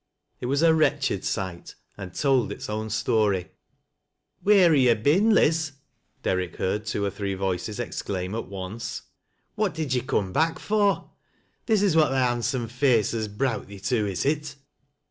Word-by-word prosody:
It 120 - -4
was 140 +4 +1
a 165 -1 +6
wretched 145 -9 +1
sight, 95 -3 -4 0.2
and 95 -3 -9
told 135 -5 +2
its - - -6
own 110 +1 -3
story. 105 -4 +1 0.5
" - - -43
Wheer 195 -5 +6
ha' 145 - +4
yo' 125 -3 +5
been, 155 - +3
Liz? 160 -7 +3 0.2
" - - -43
Derrick 90 -2 -1
heard 105 +3 -2
two 105 -1 -1
or 100 - -1
three 100 0 -3
voices 95 +3 -3
exclaim 95 -5 -4
at 115 - -4
once. 100 +4 -6 0.2
" - - -47
What 210 -3 -1
did 155 -5 -2
you 125 - +1
coom 100 -7 -1
back 165 - +1
for? 205 0 0 0.6
This 215 -3 +3
is 190 -6 +2
what 155 -2 +5
thy 130 -1 +2
handsome 120 0 -1
face 125 -2 +2
has 110 -2 -2
browt 115 +4 -2
thee 100 -1 -10
to, 105 +1 0
is 95 +3 -2
it 150 +1 -1
120 Hz, 180 wpm, -25 LUFS, 100-150 Hz, 0.6 s, a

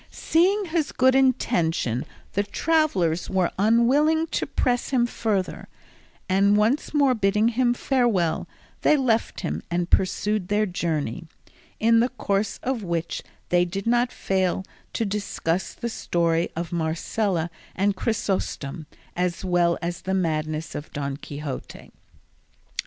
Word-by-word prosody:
Seeing 385 +5 +2
his 325 -3 -1
good 260 +1 +4
intention, 170 - +1 0.3
the 200 - +2
travellers 205 - +1
were 185 -2 +1
unwilling 265 +9 +4
to - - -1
press 245 -1 0
him 250 -3 +3
further, 215 -5 -2 0.6
and 200 +2 +4
once 225 +8 +1
more 280 -3 +4
bidding 210 0 +2
him 240 +1 +2
farewell, 235 -12 +1 0.3
they 300 - +4
left 235 -4 0
him - - -3
and 175 0 -1
pursued 200 +1 +1
their 210 +2 +2
journey, 165 - -2 0.5
in 230 +1 +5
the 240 +2 +3
course 200 -5 -1
of 255 -3 -1
which 170 -3 -2 0.3
they 175 0 +4
did 190 +3 -4
not 240 +1 +2
fail 190 0 0 0.3
to 225 - 0
discuss 195 -4 -2
the 235 - -4
story 170 -6 0
of 170 0 -4
Marcela 170 +2 -1 0.2
and 200 +1 +1
Chrysostom 185 - -2 0.3
as 180 +1 -1
well 175 -2 +2
as 175 0 -3
the 190 0 -1
madness 155 -3 -1
of 150 - -7
Don 140 -2 -3
Quixote. 145 -1 -7
195 Hz, 130 wpm, -24 LUFS, 170-240 Hz, 0.6 s, in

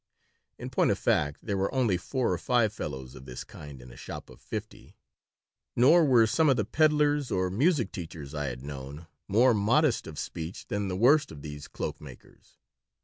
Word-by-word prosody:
In - - -7
point - - +2
of - - +1
fact, 75 -1 0
there 100 -3 -2
were 95 - 0
only 125 -8 +2
four 115 +5 -1
or 85 - -2
five 115 -1 +2
fellows 65 -9 -6
of 65 -1 -12
this 60 -1 -7
kind 70 -3 -11
in - - -13
a - - -13
shop - - -9
of - - -16
fifty. - - -8 0.8
Nor 155 +8 +6
were 125 -5 +5
some 155 +8 +2
of 130 - +3
the 105 - 0
peddlers 150 0 +2
or 95 -1 0
music 135 - +2
teachers 80 -5 -8
I 75 -1 -3
had 65 0 -6
known 70 +2 -8 0.2
more 120 +5 +4
modest 115 +6 +2
of 80 -2 -9
speech 85 +2 -6
than 100 -1 -1
the 90 -1 -3
worst 140 +8 +4
of 75 -3 -11
these 75 -1 -8
cloak - - -5
makers. - - -15
100 Hz, 195 wpm, -28 LUFS, -, 0.8 s, Nor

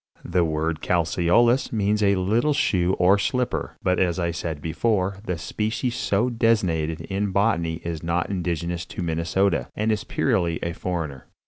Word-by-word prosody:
The 85 0 +2
word 80 0 -1
"Calceolous" 90 +9 +2
means 105 -1 +1
a 100 -1 +4
little 110 +10 +1
shoe 95 -10 +1
or 95 +3 +4
slipper; 125 +3 -1
but, 90 -1 +2
as 90 -2 +1
I 85 -2 0
said 85 -2 -4
before, 95 +5 0
the 90 - -1
species 110 +8 -2
so 105 +2 +1
designated 95 -10 +1
in 100 +4 -2
botany 90 -5 0
is 85 -2 -4
not 85 +3 -1
indigenous 85 -2 -2
to - - -5
Minnesota, 85 -2 0
and 110 +1 0
is 110 - -1
purely 90 -10 0
a 85 - -2
foreigner. 80 -7 -4
90 Hz, 155 wpm, -24 LUFS, 85-105 Hz, -, a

